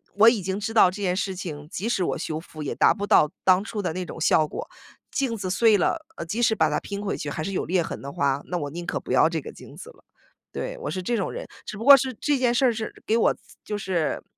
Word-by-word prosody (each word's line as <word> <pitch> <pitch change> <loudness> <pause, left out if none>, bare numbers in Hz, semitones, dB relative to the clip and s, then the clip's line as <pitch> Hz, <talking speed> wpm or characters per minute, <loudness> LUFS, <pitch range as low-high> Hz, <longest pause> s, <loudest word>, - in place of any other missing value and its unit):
我 220 +3 +8
已 230 -4 0
经 190 +1 -2
知 220 +2 -4
道 200 - +7
这 205 +3 -8
件 185 -2 0
事 190 -1 -2
情， 155 -6 -7
即 200 +6 -3
使 195 -6 +1
我 - - -1
修 155 0 -4
复 155 -2 -9
也 140 - -3
达 - - +5
不 205 -2 -4
到 150 - +5
当 185 0 +5
初 215 -1 -4
的 180 - -2
那 180 +1 -4
种 165 - -9
效 155 -1 +4
果。 310 - -7 0.4
镜 265 -5 -1
子 195 -4 -4
碎 220 +3 +4
了， 315 - 0
呃， - - -5
即 210 +9 -3
使 225 -2 +3
把 160 -6 +2
它 150 - 0
拼 200 0 -6
回 200 - -2
去 145 - -4
还 155 +2 -4
是 195 - -3
有 190 - -2
裂 180 0 +1
痕 - - -6
的 140 - -7
话， 140 0 0
那 180 - -3
我 145 -2 -4
宁 170 +4 -7
可 - - -2
不 - - -7
要 - - +5
这 - - -2
个 - - -8
镜 - - -13
子 470 - -10
了， - - -18 0.5
对， - - -4
我 - - -3
是 185 - -3
这 235 +6 -1
种 195 - -1
人。 - - -6 0.2
只 210 - -6
不 220 - -6
过 280 +2 +10
是 260 0 -2
这 290 +5 0
件 250 -2 +2
事 255 +2 +3
儿 250 - +5
是 220 0 -5
给 225 - +3
我 230 - +3
造 - - -23 0.3
就 210 - -3
是 180 -5 -1
195 Hz, 315 characters per minute, -25 LUFS, 170-225 Hz, 0.5 s, 过